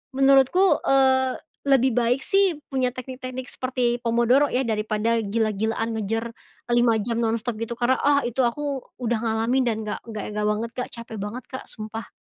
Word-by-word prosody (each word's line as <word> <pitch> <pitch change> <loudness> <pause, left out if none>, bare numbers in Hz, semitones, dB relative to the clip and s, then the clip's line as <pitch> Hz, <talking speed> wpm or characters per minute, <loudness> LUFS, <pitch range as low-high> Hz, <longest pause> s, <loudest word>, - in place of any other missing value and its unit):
menurutku, 275 +8 +4
eee, 260 -1 +3 0.2
lebih 265 -3 +3
baik 245 +2 +2
sih 390 -6 +2
punya 260 -2 0
teknik-teknik 255 0 -7
seperti 250 -2 -1
pomodoro 240 +5 +3
ya 255 - +1
daripada 215 +1 0
gila-gilaan 220 +1 -1
ngejar 225 +2 -2 0.5
5 240 -1 +4
jam 230 +2 -2
nonstop 230 +1 -1
gitu 235 +1 -3
karena, 250 +2 +3
ah, 285 0 +4
itu 250 +2 0
aku 275 +2 -1 0.2
udah 235 -2 0
ngalamin 230 +3 +1
dan 220 -2 0
nggak - - -3
nggak 215 -2 -5
e - - -6
nggak 210 0 0
banget, 225 +2 -3
Kak, 250 - -3
cape 230 -1 -8
banget, 210 +5 -5
Kak, 260 - -7
sumpah. 220 0 -7
240 Hz, 165 wpm, -24 LUFS, 225-260 Hz, 0.5 s, menurutku